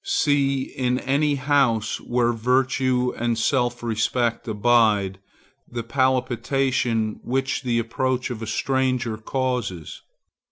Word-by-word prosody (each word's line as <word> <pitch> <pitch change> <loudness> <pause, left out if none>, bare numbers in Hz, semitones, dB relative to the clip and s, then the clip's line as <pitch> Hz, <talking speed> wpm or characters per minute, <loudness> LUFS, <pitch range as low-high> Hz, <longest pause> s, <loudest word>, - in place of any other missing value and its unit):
See, 140 -2 +1
in 125 -1 -1
any 145 +3 +1
house 130 -6 +1
where 120 -1 +1
virtue 125 +1 +1
and 120 -1 -1
self 120 +1 0
respect 115 +1 -1
abide, 105 -3 +2 0.5
the 120 -1 -4
palpitation 125 -2 0
which 135 +2 -1
the 120 -3 0
approach 125 +2 -1
of 115 -2 -6
a 115 - -5
stranger 130 -1 0
causes. 115 - -3
125 Hz, 110 wpm, -23 LUFS, 115-130 Hz, 0.5 s, abide